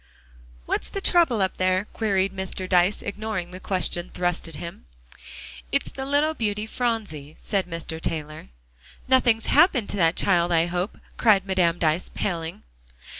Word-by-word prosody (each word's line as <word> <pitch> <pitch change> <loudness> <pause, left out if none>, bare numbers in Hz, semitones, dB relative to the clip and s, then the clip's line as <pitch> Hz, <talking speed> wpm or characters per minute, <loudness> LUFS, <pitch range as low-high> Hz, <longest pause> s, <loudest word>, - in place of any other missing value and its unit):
"What's - - -2
the 395 - -4
trouble 330 - +3
up 190 - -2
there?" 185 +1 +1
queried 195 -3 0
Mr. 190 0 -4
Dyce, 185 +2 +3
ignoring 205 -3 -4
the 185 - -8
question 185 -2 -2
thrust 175 -1 -1
at 165 - -8
him. 165 - -8 0.8
"It's - - 0
the 265 0 -5
little 290 +3 +2
beauty 210 -5 -2
Phronsie," 215 - -3
said 195 -3 -1
Mr. 165 -1 -6
Taylor. 155 - -4 0.6
"Nothing's 245 -4 +3
happened 260 - +4
to - - -2
that 165 -2 +3
child 175 -3 +2
I 165 -1 +4
hope!" 175 +3 -3 0.2
cried 200 -4 +4
Madame 180 -3 +2
Dyce, 160 +1 +1
paling. 165 -3 -3
190 Hz, 150 wpm, -25 LUFS, 170-220 Hz, 0.8 s, happened